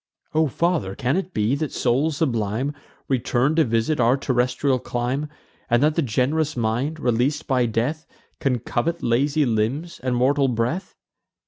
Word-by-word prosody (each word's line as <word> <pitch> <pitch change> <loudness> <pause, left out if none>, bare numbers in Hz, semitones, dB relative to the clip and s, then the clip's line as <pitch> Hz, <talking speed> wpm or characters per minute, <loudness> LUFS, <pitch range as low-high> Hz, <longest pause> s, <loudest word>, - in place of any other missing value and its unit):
"O 160 0 +3
father, 155 - 0
can 130 +2 0
it 190 0 -2
be, 110 -3 +1
that 145 +1 -1
souls 140 +5 +1
sublime 120 -1 -1 0.3
Return 130 +2 +1
to 160 - +5
visit 115 +5 0
our 120 +3 +4
terrestrial 130 +1 +1
clime, 125 +6 -2 0.4
And 120 +2 +3
that 155 +1 +4
the 165 - +1
gen'rous 140 +4 0
mind, 120 +7 -1
releas'd 130 +5 0
by 125 -3 +2
death, 125 +8 -2 0.3
Can 130 -3 +1
covet 125 +8 -2
lazy 140 +6 +2
limbs 120 +9 -1
and 125 -1 0
mortal 135 +3 +3
breath?" 125 - -2
130 Hz, 150 wpm, -23 LUFS, 120-150 Hz, 0.4 s, to